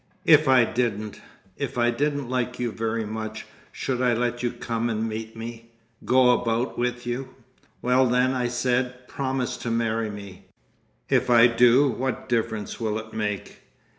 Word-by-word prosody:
"If 155 -2 +6
I 130 -2 +6
didn't—If 110 -1 -4
I 120 0 +3
didn't 145 +1 -1
like 125 0 -2
you 120 -2 -2
very 115 0 -2
much, 110 +1 -5 0.3
should 125 -2 -3
I 125 -2 +3
let 120 +1 -1
you 120 - +1
come 115 -1 -3
and 110 0 -1
meet 110 0 -6
me—go 115 +2 0
about 115 +1 -1
with 120 0 -2
you?" 120 +2 -4 0.5
"Well 125 +1 +4
then," 125 +2 +2
I 125 -2 0
said, 125 +1 -1
"promise 130 -2 -2
to 120 - -5
marry 115 -1 0
me!" 100 -2 -10 0.6
"If - - +2
I 120 -1 +7
do, 120 +3 +5
what 130 +1 -3
difference 110 -3 -2
will 110 -2 -1
it 110 0 -8
make?" 105 -2 -4
120 Hz, 155 wpm, -25 LUFS, 115-125 Hz, 0.6 s, I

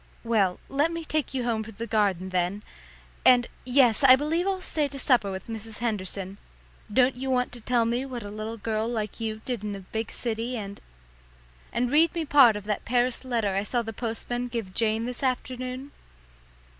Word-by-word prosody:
"Well, 210 -6 +2
let 290 +4 +1
me 335 -1 -4
take 305 -3 -2
you 255 - 0
home 225 -2 0
through 220 +1 -10
the 225 +3 -5
garden 195 -5 +1
then 185 +3 -1 0.6
and, 250 -1 +6 0.2
yes, 250 -2 +4
I 260 -1 +10
believe 320 +6 0
I'll 385 -1 0
stay 310 -5 0
to 280 0 -9
supper 250 -6 +3
with 190 0 -5
Mrs. 225 -1 -5
Henderson. 200 -3 -3 0.5
Don't 255 +3 +4
you 265 +2 -5
want 250 -1 +1
to 245 - -7
tell 235 0 +2
me 240 +3 0
what 245 -4 -6
a 205 - -7
little 215 +2 -5
girl 220 +1 -1
like 220 -3 -3
you 220 -1 -4
did 245 -5 -3
in 205 -1 -3
a 195 - -8
big 220 +4 -4
city, 235 +1 -1
and 200 -2 -7 0.9
and 245 +1 0
read 320 +4 +4
me 330 -2 -1
part 275 -6 +7
of 210 - -5
that 210 0 -2
Paris 245 +1 +1
letter 230 -6 0
I 195 - +1
saw 235 +3 -1
the 225 0 -6
postman 240 +2 -3
give 230 -6 -5
Jane 220 +1 +1
this 250 0 -5
afternoon?" 255 +1 -3
235 Hz, 195 wpm, -27 LUFS, 215-255 Hz, 0.9 s, I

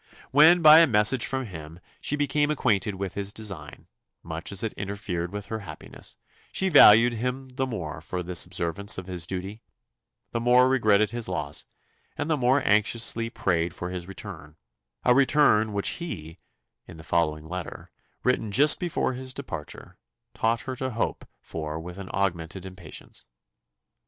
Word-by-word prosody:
When, 160 +5 +6
by 155 +1 +10
a 165 - +6
message 115 +2 +3
from 130 -1 -2
him, 80 -4 -10 0.2
she 150 - -1
became 145 0 +1
acquainted 105 -9 0
with 95 -1 -4
his 100 0 -3
design, 95 -9 -7 0.4
much 80 +2 -6
as 100 +2 0
it 110 - -2
interfered 100 -4 -4
with 105 0 -6
her 110 +2 -5
happiness, 80 -8 -11 0.3
she 190 - 0
valued 120 - +8
him 125 +3 -3
the 130 +1 -2
more 80 -10 -5
for 90 +2 -4
this 90 -1 -1
observance 90 +2 -2
of 95 - -6
his 90 -2 -4
duty; 95 +4 -6 0.7
the 115 - -1
more 125 +2 +5
regretted 110 -5 +3
his 120 -1 -5
loss, 75 -5 -4 0.5
and 150 +2 -2
the - - +4
more 130 0 +2
anxiously 115 +2 +1
prayed 85 -6 -1
for 90 0 -5
his 90 -1 -6
return 90 -6 -9 0.5
a 125 - +6
return 130 -5 +4
which 100 -1 0
he, 80 - -6 0.5
in - - -11
the 80 - -11
following 80 -2 0
letter, 90 +1 -7 0.3
written 125 -4 0
just 145 +8 +6
before 175 -7 -1
his 130 0 -5
departure, 85 - -8 0.3
taught 115 0 0
her 130 - -5
to 130 0 -2
hope 115 -2 -3 0.2
for 80 -1 -5
with 90 +3 -9
augmented 95 -2 -3
impatience. 95 -4 -9
105 Hz, 160 wpm, -26 LUFS, 90-125 Hz, 0.7 s, by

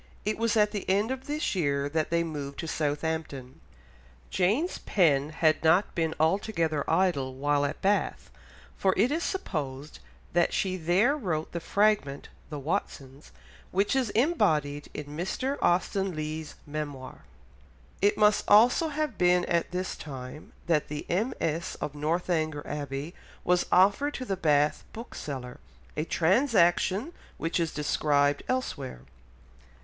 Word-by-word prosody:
It 215 +1 -1
was 230 0 +1
at 210 -1 +4
the 205 -3 -4
end 205 +5 +2
of 265 0 -5
this 300 +2 -1
year 140 -6 0
that 155 +1 -1
they 170 0 +2
moved 145 -4 -5
to 165 - -5
Southampton. 150 -4 -3 0.7
Jane's 215 - +1
pen 150 -7 +2
had 155 0 +1
not 170 +5 +4
been 160 -1 -1
altogether 165 -3 +1
idle 140 -9 +1
while 145 +1 +1
at 145 - -5
Bath, 200 +1 0 0.4
for 190 -1 +1
it 230 +8 +3
is 320 +3 0
supposed 150 - -4 0.3
that 175 0 +2
she 185 -1 0
there 185 - +2
wrote 170 - -3
the 170 - -3
fragment 200 -7 +1 0.2
The 150 - -5
Watsons 140 -3 -4 0.4
which 200 +6 +1
is 260 -4 +1
embodied 155 - +1
in 150 - -5
Mr. 190 - -3
Austen 185 +1 +1
Leigh's 155 0 -5
Memoir. 145 -3 -6 0.8
It 205 +1 +3
must 210 0 +4
also 245 +9 +6
have 300 -7 -3
been 180 0 +4
at 170 -1 0
this 180 +1 -3
time 135 0 -9
that 160 -3 +1
the 150 0 -5
MS. 170 - -1
of 145 - -4
Northanger 155 0 -1
Abbey 145 +2 -5 0.3
was 180 0 +2
offered 200 +11 +4
to 255 - -5
the 195 - -1
Bath 150 -4 +2
bookseller, 135 - -7 0.4
a 155 - -1
transaction 190 - +2 0.2
which 165 +2 -1
is 165 -2 0
described 145 -1 +1
elsewhere. 145 - -3
170 Hz, 140 wpm, -28 LUFS, 150-205 Hz, 0.8 s, also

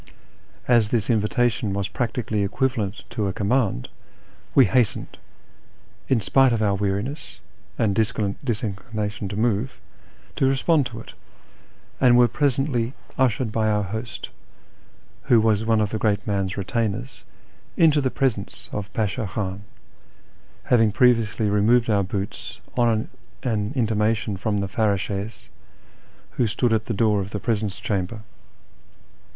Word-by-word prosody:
As 115 -4 +4
this 115 -1 +1
invitation 110 0 +1
was 100 -1 -1
practically 115 -3 -2
equivalent 110 -1 -1
to 110 -4 -1
a 95 - -2
command, 100 - 0 0.7
we 135 - +8
hastened, 115 +2 0 0.9
in 125 -4 +2
spite 135 +4 +4
of 115 -2 +1
our 100 -2 +2
weariness 100 +9 -3 0.4
and 105 -3 +2
dis 110 +1 +1 0.5
inclination 105 -1 -4
to 100 - -5
move, 115 +2 0 0.6
to 135 - +3
respond 135 +1 +2
to 120 -2 -9
it, - - -12 0.9
and 125 -2 +6
were 120 0 +6
presently 135 -3 0 0.2
ushered 125 -2 +1
by 110 0 +1
our 105 -1 +1
host, 110 +3 -5 1.0
who 120 - +5
was 110 -1 +2
one 110 -1 +3
of 105 -2 0
the 110 - -2
great 100 -2 +1
man's 100 -2 -1
retainers, 115 +5 -2 0.5
into 155 -3 +5
the 130 - +1
presence 120 -7 -2
of 105 0 -5
Pashti 110 +2 -1
Khan, 95 0 -4 1.0
having 115 -3 +3
previously 115 -2 +3
removed 110 +3 +3
our 100 -1 +3
boots 95 +1 -5 0.2
on 115 -3 +2 0.4
an 110 -3 -1
intimation 110 -3 +1
from 105 +2 -1
the 100 -1 -1
farrdshes 100 0 -1 0.9
who 120 - +1
stood 115 +2 +1
at 110 0 0
the 115 - -1
door 105 -1 +2
of 95 - -5
the 105 - -4
presence 105 -2 -1
chamber. 100 +2 -2
110 Hz, 135 wpm, -23 LUFS, 100-120 Hz, 1.0 s, we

